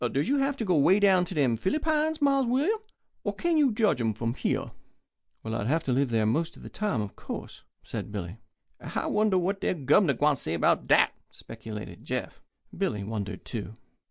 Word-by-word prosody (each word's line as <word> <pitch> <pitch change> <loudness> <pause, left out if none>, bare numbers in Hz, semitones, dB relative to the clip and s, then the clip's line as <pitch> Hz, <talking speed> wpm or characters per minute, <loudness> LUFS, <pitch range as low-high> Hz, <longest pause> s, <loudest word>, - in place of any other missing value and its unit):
Does 140 +3 0
you 280 +1 +2
have 275 0 0
to 225 - -2
go 185 - +2
way 185 +8 +5
down 190 -3 +4
to 180 - -7
dem 135 -6 +2
Fillypines, 310 - 0
Mars 275 -2 +3
William, 295 - +1 0.4
or - - -2
kin 340 -1 0
you 290 -5 +4
judge 210 - +2
'em 110 -2 0
from 115 +1 -2
here?" - - -2 0.7
"I'd 110 -1 -2
have 160 +5 +1
to 130 - -1
live 135 +1 +2
there 110 -2 +1
most 160 +10 0
of - - -14
the - - -8
time, 210 - -1
of 100 - -8
course," - - -7 0.2
said - - -6
Billy. 100 -1 -5 0.4
"I - - -3
wonder 210 -3 +2
what 195 +3 -1
de - - 0
Gubnor 145 +1 +3
gwine 145 -1 +3
say 80 - -3
'bout - - +2
dat," - - +5 0.2
speculated 105 -1 -9
Jeff. - - -4 0.3
Billy 105 -1 -1
wondered 105 -2 -5
too. 105 -2 -6
155 Hz, 195 wpm, -28 LUFS, -, 0.7 s, way